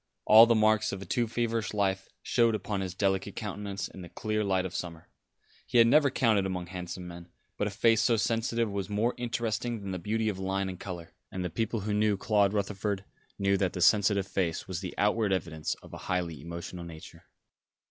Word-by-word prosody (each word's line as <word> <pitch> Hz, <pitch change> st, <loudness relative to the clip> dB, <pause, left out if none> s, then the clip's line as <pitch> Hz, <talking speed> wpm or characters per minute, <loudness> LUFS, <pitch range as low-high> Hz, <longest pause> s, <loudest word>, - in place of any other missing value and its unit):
All 110 Hz, +2 st, +9 dB
the 115 Hz, -, +4 dB
marks 110 Hz, 0 st, +3 dB
of 95 Hz, 0 st, -5 dB
a -, -, -10 dB
too 120 Hz, +6 st, 0 dB
feverish 115 Hz, -2 st, -1 dB
life 95 Hz, -2 st, 0 dB
showed 115 Hz, -2 st, +3 dB
upon 100 Hz, -1 st, -3 dB
his 95 Hz, -2 st, -4 dB
delicate 95 Hz, 0 st, 0 dB
countenance 100 Hz, -2 st, -4 dB
in 95 Hz, -, -11 dB
the 90 Hz, -, -9 dB
clear 110 Hz, +2 st, -2 dB
light 95 Hz, -2 st, +1 dB
of 90 Hz, -, -5 dB
summer. 85 Hz, -2 st, -6 dB, 0.6 s
He -, -, +1 dB
had 115 Hz, -, +8 dB
never 140 Hz, +4 st, +5 dB
counted 115 Hz, -6 st, +2 dB
among 90 Hz, -2 st, -3 dB
handsome 90 Hz, 0 st, -6 dB
men; 85 Hz, 0 st, -10 dB, 0.3 s
but 105 Hz, -, -1 dB
a -, -, -1 dB
face 110 Hz, +2 st, +3 dB
so 115 Hz, 0 st, +3 dB
sensitive 115 Hz, 0 st, 0 dB
was 100 Hz, -1 st, -3 dB
more 110 Hz, +4 st, +1 dB
interesting 120 Hz, -1 st, -2 dB
than 100 Hz, -1 st, -6 dB
the 95 Hz, -, -3 dB
beauty 110 Hz, +5 st, -1 dB
of 100 Hz, -3 st, -2 dB
line 95 Hz, 0 st, -1 dB
and 90 Hz, -1 st, -7 dB
colour, 85 Hz, -4 st, -7 dB, 0.2 s
and 90 Hz, -3 st, -4 dB
people 115 Hz, -1 st, -1 dB
who 105 Hz, +1 st, -2 dB
knew 105 Hz, -1 st, +2 dB
Claude 100 Hz, -1 st, +2 dB
Rutherford 100 Hz, -1 st, -2 dB, 0.3 s
knew 100 Hz, 0 st, +2 dB
that 95 Hz, -2 st, 0 dB
the 90 Hz, -, -4 dB
sensitive 100 Hz, 0 st, +4 dB
face 85 Hz, -5 st, -2 dB
was 95 Hz, -4 st, -3 dB
the 95 Hz, -, -6 dB
outward 105 Hz, 0 st, +2 dB
evidence 85 Hz, -5 st, -2 dB
of -, -, -14 dB
a -, -, -6 dB
highly 85 Hz, -5 st, -1 dB
emotional 85 Hz, +2 st, -7 dB
nature. 80 Hz, -2 st, -11 dB
100 Hz, 205 wpm, -29 LUFS, 95-110 Hz, 0.6 s, All